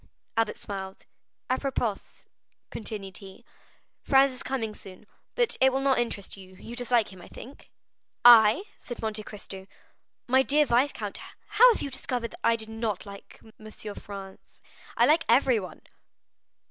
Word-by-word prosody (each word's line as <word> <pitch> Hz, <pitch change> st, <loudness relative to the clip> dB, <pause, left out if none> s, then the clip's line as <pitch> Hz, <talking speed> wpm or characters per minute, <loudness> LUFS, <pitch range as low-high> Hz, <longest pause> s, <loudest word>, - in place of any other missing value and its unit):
Albert 225 Hz, -1 st, +1 dB
smiled. 190 Hz, -1 st, -7 dB, 0.4 s
"Apropos," 255 Hz, -5 st, -1 dB, 0.7 s
continued 205 Hz, -4 st, -6 dB
he, 195 Hz, -2 st, -13 dB, 0.6 s
"Franz 270 Hz, 0 st, +4 dB
is 255 Hz, -, -9 dB
coming 225 Hz, -5 st, -3 dB
soon, 190 Hz, 0 st, -13 dB, 0.3 s
but 480 Hz, -1 st, +1 dB
it 265 Hz, 0 st, +6 dB
will 265 Hz, -, 0 dB
not 270 Hz, -2 st, +2 dB
interest 230 Hz, -5 st, -3 dB
you; 190 Hz, -1 st, -14 dB
you 230 Hz, +5 st, -10 dB
dislike 240 Hz, -4 st, +1 dB
him, 185 Hz, -, -13 dB
I -, -, -12 dB
think?" 265 Hz, +4 st, -12 dB, 0.6 s
"I?" 230 Hz, -, +8 dB, 0.2 s
said 240 Hz, -3 st, -8 dB
Monte 215 Hz, -1 st, -2 dB
Cristo; 195 Hz, -2 st, -10 dB, 0.6 s
"my 260 Hz, +2 st, +5 dB
dear 295 Hz, +3 st, +3 dB
viscount, 255 Hz, +3 st, 0 dB, 0.3 s
how 455 Hz, +4 st, +7 dB
have 450 Hz, -, -2 dB
you 280 Hz, -, -4 dB
discovered 250 Hz, -2 st, -3 dB
that -, -, -13 dB
I 230 Hz, -, +4 dB
did 220 Hz, -1 st, -4 dB
not 225 Hz, -2 st, -3 dB
like 200 Hz, -1 st, -12 dB, 0.2 s
M. 215 Hz, 0 st, -11 dB, 0.2 s
Franz! 195 Hz, -1 st, -11 dB, 0.4 s
I -, -, +5 dB
like 320 Hz, +3 st, +4 dB
everyone." 235 Hz, -5 st, +2 dB
230 Hz, 145 wpm, -27 LUFS, 200-265 Hz, 0.7 s, I